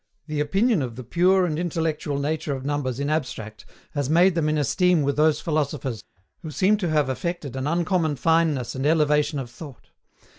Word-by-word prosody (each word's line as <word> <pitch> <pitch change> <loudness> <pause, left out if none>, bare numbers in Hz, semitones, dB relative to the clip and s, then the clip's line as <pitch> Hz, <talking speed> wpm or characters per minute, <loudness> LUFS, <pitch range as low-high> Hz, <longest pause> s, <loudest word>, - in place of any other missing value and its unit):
The 155 -2 -3
opinion 195 +6 +2
of 120 -4 -4
the 130 - -7
pure 180 +8 +3
and 155 -2 -2
intellectual 160 -4 -2
nature 145 0 -2
of 130 0 -7
numbers 140 -3 -2
in 140 - -1
abstract 130 -8 -4 0.2
has 145 -2 -2
made 175 +4 +5
them 160 -3 0
in 155 - +1
esteem 175 +2 +2
with 140 0 0
those 155 +1 +3
philosophers 145 -7 -2 0.4
who 160 - -7
seem 195 +7 +2
to 180 -5 -2
have 150 -3 +2
affected 140 0 -4
an 130 +1 -2
uncommon 165 -1 +1
fineness 160 -4 +1
and 135 +2 -1
elevation 150 -1 +2
of 125 -3 -5
thought. 140 0 -12
150 Hz, 185 wpm, -24 LUFS, 140-165 Hz, 0.4 s, made